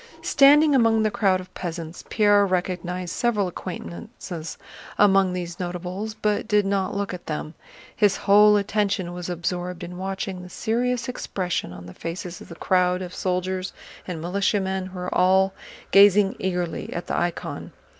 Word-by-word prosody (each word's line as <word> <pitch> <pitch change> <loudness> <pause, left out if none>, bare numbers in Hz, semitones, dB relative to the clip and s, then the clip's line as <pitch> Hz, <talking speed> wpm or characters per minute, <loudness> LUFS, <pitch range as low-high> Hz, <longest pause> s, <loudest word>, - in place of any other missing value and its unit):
Standing 290 +2 +6
among 225 -4 +4
the 215 - +1
crowd 195 -3 +2
of 185 - -11
peasants, 170 -1 -6
Pierre 205 -2 +4
recognized 180 -1 -2
several 220 -5 +1
acquaintances 175 -2 -7 0.4
among 195 -2 +5
these 175 -1 -5
notables, 180 +4 -4
but 210 -1 -1
did 210 -2 +3
not 195 -1 -1
look 200 -1 -2
at 180 - -9
them—his 165 +6 -2
whole 210 +1 +7
attention 200 -3 -1
was 180 0 -6
absorbed 175 +1 -3
in 180 +1 -7
watching 190 -1 -4
the 180 - -10
serious 240 +4 -1
expression 185 - -3
on 90 0 -10
the 90 - -10
faces 170 +1 -6
of - - -12
the 170 - -9
crowd 180 +1 +1
of 180 0 -8
soldiers 185 0 -2 0.3
and 175 -3 -4
militiamen 190 +2 -1
who 190 0 -10
were 180 0 -4
all 190 +1 +4 0.4
gazing 200 0 +6
eagerly 180 -3 -2
at 175 - -4
the - - -3
icon. 175 0 -3
185 Hz, 155 wpm, -24 LUFS, 180-205 Hz, 0.4 s, whole